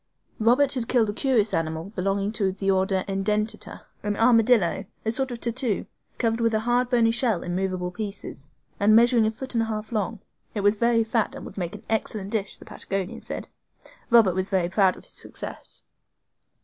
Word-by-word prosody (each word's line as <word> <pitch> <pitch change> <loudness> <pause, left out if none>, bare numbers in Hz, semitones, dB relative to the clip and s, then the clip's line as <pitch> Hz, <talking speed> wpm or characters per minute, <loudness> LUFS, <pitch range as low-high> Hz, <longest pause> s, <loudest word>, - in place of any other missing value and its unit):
Robert 250 +5 +4
had 245 -4 -2
killed 225 -4 +2
a - - -9
curious 225 -4 +1
animal 160 +3 -2
belonging 195 0 -1
to 205 -3 0
the 195 +1 0
order 190 0 +1
EDENTATA, 210 +3 -2 0.2
an 205 0 -2
armadillo, 225 -5 +4 0.2
a 220 - +1
sort 265 +3 0
of 240 -1 -6
tatou, 235 -3 0 0.3
covered 230 -1 0
with 230 -1 +2
a 215 - +1
hard 245 +2 +1
bony 235 -2 +4
shell, 230 -6 0
in 175 0 -3
movable 185 -1 -2
pieces, 195 -8 -5 0.3
and 210 +2 +5
measuring 235 -1 +5
a - - +3
foot 255 +4 -7
and 230 - +2
a 225 - -1
half 215 0 -4
long. 220 0 -2 0.4
It 205 - -1
was 205 +1 +4
very 230 +1 +2
fat 225 0 0
and - - -8
would - - -10
make 175 -1 -4
an 210 - -11
excellent 215 -2 -2
dish, 205 -3 -2
the - - -14
Patagonian 195 -1 -4
said. - - -5 0.6
Robert 230 -6 +6
was 185 +2 -2
very 185 -3 +1
proud 190 -1 +3
of - - -14
his - - -12
success. - - -7
215 Hz, 195 wpm, -25 LUFS, 195-230 Hz, 0.6 s, Robert